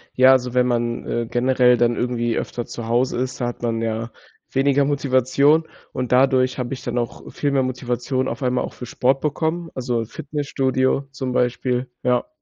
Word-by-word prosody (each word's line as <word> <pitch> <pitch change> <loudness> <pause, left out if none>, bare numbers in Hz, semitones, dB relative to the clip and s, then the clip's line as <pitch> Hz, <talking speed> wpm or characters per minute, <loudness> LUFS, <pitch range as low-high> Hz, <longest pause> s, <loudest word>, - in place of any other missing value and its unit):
Ja, 130 +1 +7
also, 125 -1 +2
wenn 125 0 +3
man, 120 -1 -1
äh, 120 0 -1
generell 125 0 +3
dann 120 0 +2
irgendwie 120 -1 -1
öfter 120 - -3
zu 115 -1 -7
Hause 120 +1 +1
ist, 130 +1 -3
da 120 - 0
hat 120 - -6
man 115 -1 -1
ja 115 +1 -2 0.4
weniger 140 +1 +3
Motivation. 140 +3 +2 0.2
Und 125 -1 -3
dadurch 130 0 +3
habe 125 +1 -3
ich 130 - -7
dann 120 0 -3
auch 120 -1 -4
viel 145 -1 -1
mehr 135 -1 +2
Motivation 130 +1 -2
auf 120 +5 -4
einmal 125 0 +1
auch - - -6
für 125 - -8
Sport 130 +3 +1
bekommen. 160 +3 -1
Also, 120 -3 -1
Fitnessstudio 135 0 -1
zum 130 -2 -4
Beispiel, 125 +1 0
ja. 125 - +1
125 Hz, 185 wpm, -22 LUFS, 120-135 Hz, 0.4 s, Ja